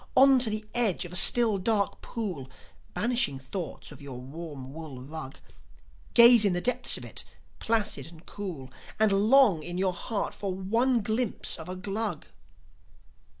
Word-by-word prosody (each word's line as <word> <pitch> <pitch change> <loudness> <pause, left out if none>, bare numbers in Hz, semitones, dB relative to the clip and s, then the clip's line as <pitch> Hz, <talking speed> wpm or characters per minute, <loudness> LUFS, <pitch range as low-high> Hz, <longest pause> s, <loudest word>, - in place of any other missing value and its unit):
On 270 0 +7
to 245 -3 +2
the 215 0 -3
edge 220 -7 +1
of 175 - -10
a - - -6
still, 220 +1 +6
dark 200 +1 0
pool, 185 - -5 0.5
Banishing 210 - 0
thoughts 150 +7 -7
of 145 -1 -13
your 135 -3 -8
warm 135 -1 -9
wool 155 -5 -9
rug; 135 +1 -8 0.8
Gaze 235 -1 +8
in 200 -3 +2
the 175 - 0
depths 250 +5 +1
of - - -9
it, - - -6 0.4
placid 215 - -1
and 165 +1 -15
cool, 170 -11 -7 0.3
And 215 -1 +4
long 210 - +4
in 175 +3 -6
your 185 0 0
heart 205 +4 -4
for 195 -2 -4
one 230 +6 +1
glimpse 220 +2 -1
of 160 - -9
a 185 - -5
Glug. 200 -1 -4
195 Hz, 160 wpm, -27 LUFS, 160-225 Hz, 0.8 s, Gaze